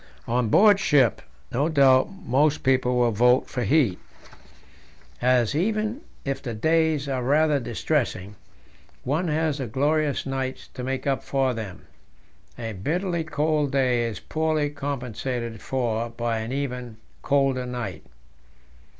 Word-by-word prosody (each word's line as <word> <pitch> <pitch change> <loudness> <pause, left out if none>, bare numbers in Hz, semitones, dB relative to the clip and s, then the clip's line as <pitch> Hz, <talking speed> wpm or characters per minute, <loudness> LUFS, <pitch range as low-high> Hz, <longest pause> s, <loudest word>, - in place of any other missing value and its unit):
On 120 -1 +1
board 205 - +6
ship 135 - +3 0.3
no 145 +6 +1
doubt 135 -4 +5
most 150 -5 +1
people 130 -1 +2
will 120 -1 +3
vote 125 +4 +3
for 125 - -4
heat, 120 - +2 1.2
as, 125 -1 +3
even 215 - -1 0.2
if 135 -1 -2
the 120 -4 -5
days 160 +3 +1
are 130 -2 -1
rather 145 +3 +3
distressing, 115 -5 -2 0.7
one 155 +7 0
has 155 -1 0
the 130 - -3
glorious 145 +5 0
nights 135 -1 -4
to 125 - -6
make 130 +1 -3
up 135 -1 0
for 135 -2 0
them. 110 -5 -7 0.7
A 115 -2 -5
bitterly 170 - -1
cold 150 -2 0
day 130 -3 +2
is 115 - -5
poorly 155 -2 -1
compensated 125 -5 -4
for 120 -3 -1
by 115 -1 -2
an 110 +2 -5
even 125 -4 -4 0.2
colder 135 -3 +1
night. 125 -2 -5
135 Hz, 135 wpm, -25 LUFS, 120-150 Hz, 1.2 s, board